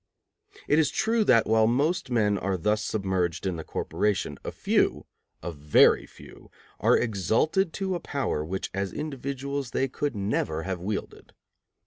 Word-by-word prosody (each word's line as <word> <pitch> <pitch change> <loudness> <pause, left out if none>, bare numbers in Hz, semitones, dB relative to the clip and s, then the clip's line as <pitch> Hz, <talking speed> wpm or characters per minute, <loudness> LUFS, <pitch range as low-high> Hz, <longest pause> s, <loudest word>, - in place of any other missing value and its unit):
It 150 - +4
is 155 -3 +3
true 225 0 +1
that, 115 - +5
while 110 0 +4
most 140 +6 +1
men 105 -4 +2
are 95 -1 -1
thus 105 +5 0
submerged 95 -6 -1
in 95 -2 -1
the 80 - -5
corporation, 105 +4 -2
a - - -4
few, - - +1 0.4
a 85 - -3
very 75 -1 +4
few, - - -15 0.3
are - - +4
exalted 120 - +1
to 190 -1 -2
a 175 - -2
power 140 - -2
which 95 +5 -4
as 95 0 -2
individuals 140 -2 -4
they 135 - 0
could 140 +1 -3
never 95 -6 -1
have 95 0 -3
wielded. 100 +3 -5
110 Hz, 155 wpm, -27 LUFS, 95-140 Hz, 0.4 s, that